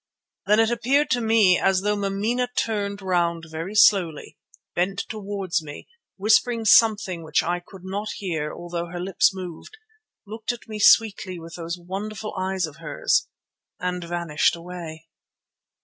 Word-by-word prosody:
Then 210 +2 +4
it 225 +1 +3
appeared 265 +5 +1
to 245 -2 +2
me 220 -5 +4
as 190 -1 +2
though 210 +1 +1
Mameena 205 +5 -1
turned 200 -2 -1
round 170 -3 0
very 165 +6 -5
slowly, 190 -7 +3 0.4
bent 195 +3 -1
towards 200 -5 -3
me, 145 -2 -10 0.3
whispering 225 +3 +2
something 210 -5 +4
which 155 -2 +1
I 175 +1 -1
could 190 0 -14
not 200 +3 -4
hear 160 -6 -3
although 175 0 -5
her 175 +1 -6
lips 195 +4 +3
moved, 185 - -9 0.5
looked 220 +2 -4
at 240 - -10
me 215 -1 -6
sweetly 200 -4 +4
with 165 0 -11
those 170 0 -5
wonderful 200 +4 -6
eyes 190 -1 -1
of 150 -3 -11
hers - - 0 0.5
and 180 0 -3
vanished 170 -3 0
away. 170 -2 -8
190 Hz, 150 wpm, -24 LUFS, 175-215 Hz, 0.5 s, Then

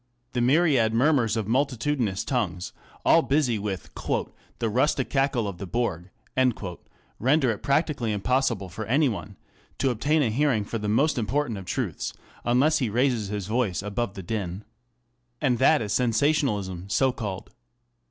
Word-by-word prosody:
The 125 - 0
myriad 130 -4 +3
murmurs 120 -4 +3
of 110 -3 -2
multitudinous 125 -4 0
tongues, 95 -9 -2 0.3
all 165 - +6
busy 135 -7 +1
with 100 -3 -4 0.3
" - - -29
the 115 - -1
rustic 130 +4 +1
cackle 135 -5 +1
of 95 -3 -6
the 100 - -5
bourg," 95 -5 -2 1.1
render 135 +1 +3
it 105 - -5
practically 140 -5 +1
impossible 115 -1 0
for 110 +5 -6
any 140 +6 +3
one 105 -3 -5 0.4
to 135 - +1
obtain 145 +6 +1
a 115 - +1
hearing 125 -4 +1
for 115 - -4
the 105 0 -2
most 140 +6 +2
important 120 -1 -1
of 95 - -9
truths, 100 -1 -3 0.3
unless 140 +7 +3
he 125 -5 0
raises 120 -1 +1
his 100 -1 -4
voice 105 -6 0
above 105 0 -3
the 95 - -7
din. 95 0 -4 0.7
And 125 -5 +1
that 140 +1 +4
is 105 - -2
sensationalism 110 - +1
so 130 +5 +3
called. 105 -8 -6
120 Hz, 155 wpm, -26 LUFS, 105-135 Hz, 1.1 s, all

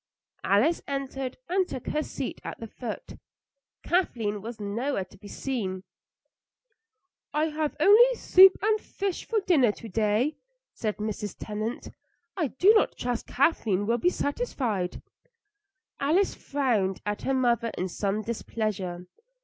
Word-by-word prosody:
Alice 245 +13 +3
entered 270 -2 -4
and 370 +1 +1
took 255 - -6
her 305 - 0
seat - - -5
at - - -6
the 230 - -6
foot. 225 0 -7 0.6
Kathleen 225 - 0
was 230 +2 -7
nowhere 210 +1 -2
to 195 - -19
be 205 +1 -13
seen. 200 -6 -3 1.5
"I 310 +1 +2
have 305 -1 -2
only 455 +9 +7
soup 380 -3 +7
and 430 0 +3
fish 395 -3 -4
for 445 -2 +1
dinner 285 - +4
to 230 - -10
day," 220 +7 +1 0.4
said 215 -2 -3
Mrs. 210 -1 -4
Tennant. 215 +3 -4 0.4
"I 330 -6 0
do 410 - +5
trust 245 -1 -3
Kathleen 225 - +1
will 235 +3 +1
be 355 - +3
satisfied." 255 - -2 1.0
Alice 330 +8 +2
frowned 230 -10 0
at 210 0 -2
her 270 - 0
mother 235 -2 +2
in 185 - -1
some 200 +3 -2
displeasure. 205 -5 -3
240 Hz, 135 wpm, -27 LUFS, 210-310 Hz, 1.5 s, only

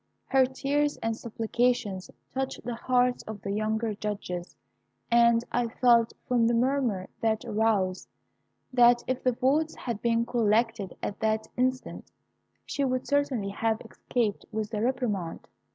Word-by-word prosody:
"Her 265 -1 +4
tears 290 +3 0
and 225 0 0
supplications 230 -3 -1 0.2
touched 265 0 -3
the 245 - -3
hearts 250 +1 +1
of 215 -2 -7
the 200 - -3
younger 215 +2 -1
judges, 200 -4 -5 0.6
and 235 0 +5
I 240 -1 +1
felt, 235 -1 +3
from 240 -2 +3
the 235 - +2
murmur 240 -6 +1
that 220 -1 0
arose, 205 -4 0 0.7
that 240 -1 +6
if 255 0 -2
the 255 - +3
votes 290 +6 +1
had 235 -4 -5
been 230 0 +2
collected 225 -3 +1
at 200 - -3
that 220 0 0
instant, 255 +1 -2 0.5
she 280 - -2
would 255 -1 0
certainly 280 -8 0
have 220 +2 0
escaped 225 -2 -2
with 215 +1 -3
a 210 - -1
reprimand. 215 -8 -2
235 Hz, 140 wpm, -28 LUFS, 215-250 Hz, 0.7 s, that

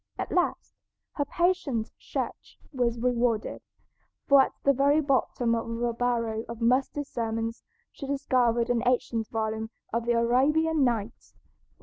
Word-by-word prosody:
At - - -4
last 355 -1 0 0.4
her 285 - -2
patient 320 -9 0
search - - -5 0.2
was 240 -3 0
rewarded, 240 -2 0 0.7
for 280 -1 +7
at - - 0
the 280 - +4
very 280 +3 +3
bottom 265 -4 +1
of 230 +1 -2
a 240 -1 +1
barrel 230 -2 -1
of 235 -1 -6
musty 255 +5 +1
sermons 230 -3 -3 0.3
she 275 - -8
discovered 245 -4 +1
an 235 -1 +1
ancient 235 -3 0
volume 220 0 -2 0.2
of 230 0 -1
"The 240 - +3
Arabian 280 +7 +3
Nights." 235 -3 -2
240 Hz, 135 wpm, -27 LUFS, 230-275 Hz, 0.7 s, for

